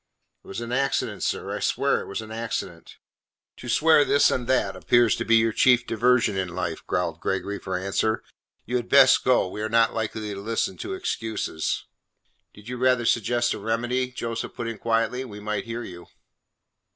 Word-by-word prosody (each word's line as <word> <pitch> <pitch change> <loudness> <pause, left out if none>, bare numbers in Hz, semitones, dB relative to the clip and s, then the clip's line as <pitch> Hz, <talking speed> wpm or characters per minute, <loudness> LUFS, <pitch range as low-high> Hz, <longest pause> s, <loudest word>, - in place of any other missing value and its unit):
"It - - -20
was 95 - -6
an 120 0 -6
accident, 135 +2 -1
sir. - - -2
I - - -4
swear - - +1
it - - -9
was 105 +3 -4
an 110 - -11
accident!" 115 0 -5 0.6
"To 120 - -8
swear 155 +4 +5
this 145 0 +4
and 125 -2 -2
that 130 0 +1
appears 120 -2 +3
to 115 - -3
be 115 - +4
your 115 0 +4
chief 125 0 +4
diversion 120 -2 +2
in 95 -1 -1
life," 85 -2 -4
growled 85 -2 -1
Gregory 100 +2 -2
for 95 -1 -3
answer. 100 +4 -1 0.4
"You 125 +2 -1
had 120 - -5
best 135 -2 +6
go; 130 -6 +3
we 100 +3 -6
are 110 - -2
not 115 0 +3
likely 110 -1 -3
to 100 - -7
listen 115 - -1
to 380 +1 -5
excuses." 110 - -3 0.7
"Did 105 +1 -16
you 125 0 -5
rather 125 -1 +2
suggest 120 +2 +1
a - - -6
remedy," 120 +3 -1
Joseph 115 -2 -5
put 115 - -4
in 115 -3 -5
quietly, 115 +2 0
"we 105 -5 -9
might 105 0 -3
hear 115 +1 -5
you." 85 -4 -10
115 Hz, 190 wpm, -25 LUFS, 105-125 Hz, 0.7 s, best